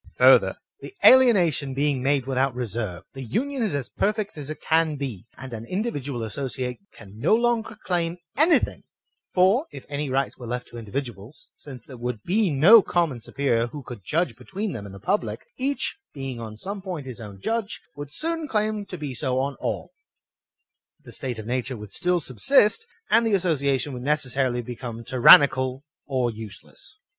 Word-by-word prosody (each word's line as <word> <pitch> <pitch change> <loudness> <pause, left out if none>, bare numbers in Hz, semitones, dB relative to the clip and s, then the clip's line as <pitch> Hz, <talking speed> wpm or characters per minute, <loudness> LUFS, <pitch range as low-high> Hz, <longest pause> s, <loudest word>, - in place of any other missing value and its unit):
Further, - - +6 0.2
the 395 - -10
alienation 175 - +5
being 140 -2 +1
made 135 -1 +1
without 135 -1 0
reserve, 110 -6 -4
the 135 - -8
union 255 - -2
is 210 -9 0
as 140 -3 -3
perfect 210 0 -1
as 145 -2 -6
it 155 - -6
can 160 -1 +2
be, 120 -8 -6
and 130 -1 -8
an 110 -1 -6
individual 145 - -3
associate 125 +1 -4
can 100 +2 -14
no 215 - +4
longer 235 -2 0
claim 175 -1 -1 0.2
anything; 315 +5 +3 0.5
for, 195 - +4
if 135 - -10
any 145 0 -3
rights 135 +1 -1
were 120 - -8
left 125 +1 -4
to 120 - -9
individuals, 115 +1 -7
since 130 -5 -11
there 130 - -11
would 120 -2 -4
be 205 +2 +2
no 170 +11 +8
common 170 -9 0
superior 120 -1 0
who 145 +3 -9
could 120 -5 -9
judge 165 - 0
between 195 +1 -5
them 100 -3 -6
and 100 - -10
the - - -10
public, 195 - -2
each, 275 +2 -1 0.2
being 135 -3 -5
on 110 -2 -7
some 200 - -6
point 180 -7 -5
his 125 -3 -8
own 100 -3 -9
judge, 225 - -2 0.2
would 145 -1 -8
soon 325 - -3
claim 215 -3 -1
to 180 - -7
be 145 -4 -5
so 130 0 -1
on 135 +1 -1
all; - - -3 1.1
the - - -12
state 125 -3 -4
of 110 - -7
nature 125 +1 -2
would 105 -2 -10
still 180 0 +1
sub 130 -8 -8
sist, 275 - +4 0.2
and 225 +2 +5
the 225 -3 +2
association 145 -6 +1
would 125 - -6
necessarily 130 -3 +1
become 120 -1 -7
tyran 130 +3 +8
nical 130 0 -4 0.2
or 130 -4 0
useless. 110 - -11
140 Hz, 180 wpm, -24 LUFS, 120-185 Hz, 1.1 s, no